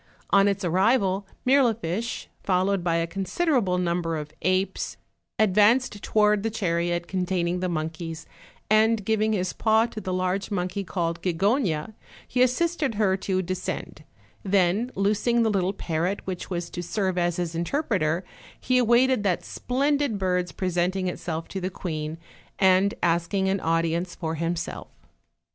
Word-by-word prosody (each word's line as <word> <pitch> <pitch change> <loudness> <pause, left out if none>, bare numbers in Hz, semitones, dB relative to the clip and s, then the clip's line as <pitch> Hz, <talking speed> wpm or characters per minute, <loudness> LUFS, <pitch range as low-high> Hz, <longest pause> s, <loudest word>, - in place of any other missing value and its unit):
On 200 0 +5
its 200 -1 0
arrival, 195 +2 +2 0.2
Mirli 255 -3 +4
ficbe, 215 +3 -3 0.2
followed 190 0 +1
by 170 -1 +1
a 165 0 +1
considerable 195 - 0
number 170 -2 -1
of 150 0 -7
apes, 185 +1 0 0.4
ad 215 -4 +3
vanced 210 +1 +3
toward 210 -1 +3
the 225 - -1
chariot 175 -4 -1
containing 180 -1 -1
the 185 0 -1
monkeys, 160 0 -4 0.4
and 215 -1 +3
giving 220 0 +1
his 185 -3 -1
paw 220 0 +3
to 220 -2 -7
the 185 - -4
large 185 +1 -1
monkey 185 0 -2
call 170 -2 -1
Gigogna, 185 - 0 0.3
he 250 - 0
as 255 -1 +5
sisted 320 -4 -1
her 200 -3 +2
to 190 -1 -1
descend; 185 +1 -5 0.4
then 195 +4 +2
loosing 215 +4 +2
the 220 - +2
little 190 -2 +1
parrot 180 0 -2
which 185 -2 -5
was 175 -2 -4
to 175 - -4
serve 185 +1 -1
as 175 -1 +1
his 175 -2 -2
interpreter, 170 - 0 0.4
he 255 0 +2
awaited 245 +1 +4
that 190 -4 0
splendid 280 -2 0
bird's 180 -2 0
presenting 185 +1 -1
itself 165 -2 -4
to 190 - -4
the 185 - -1
queen, 155 -4 -4 0.4
and 190 +1 +4
asking 175 +3 +1
an 195 +1 +1
audi 165 0 +1
ence 175 +1 -3
for 160 -3 -3
himself. 165 +1 -3
190 Hz, 155 wpm, -25 LUFS, 175-215 Hz, 0.4 s, On